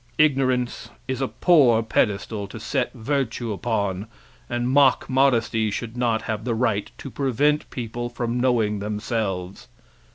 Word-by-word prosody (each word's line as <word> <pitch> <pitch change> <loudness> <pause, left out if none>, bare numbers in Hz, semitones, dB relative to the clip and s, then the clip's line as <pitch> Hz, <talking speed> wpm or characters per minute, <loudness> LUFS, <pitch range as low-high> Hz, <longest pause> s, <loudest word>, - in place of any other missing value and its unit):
Ignorance 130 -5 +1 0.2
is 130 0 -2
a 135 - +1
poor 130 -12 +4
pedestal 105 -1 0
to - - -9
set - - -1
virtue 120 -3 -2
upon 100 -2 -2 0.4
and 120 0 -1
mock 135 0 +4
modesty 115 -5 +2
should 115 +2 -5
not 115 -3 0
have 110 -1 -3
the 120 -1 -1
right 110 -4 0
to 135 - -8
prevent 145 +3 +1
people 120 0 -4
from 120 0 -2
knowing 115 -5 +1
themselves. 105 -3 -3
120 Hz, 135 wpm, -23 LUFS, 110-130 Hz, 0.4 s, poor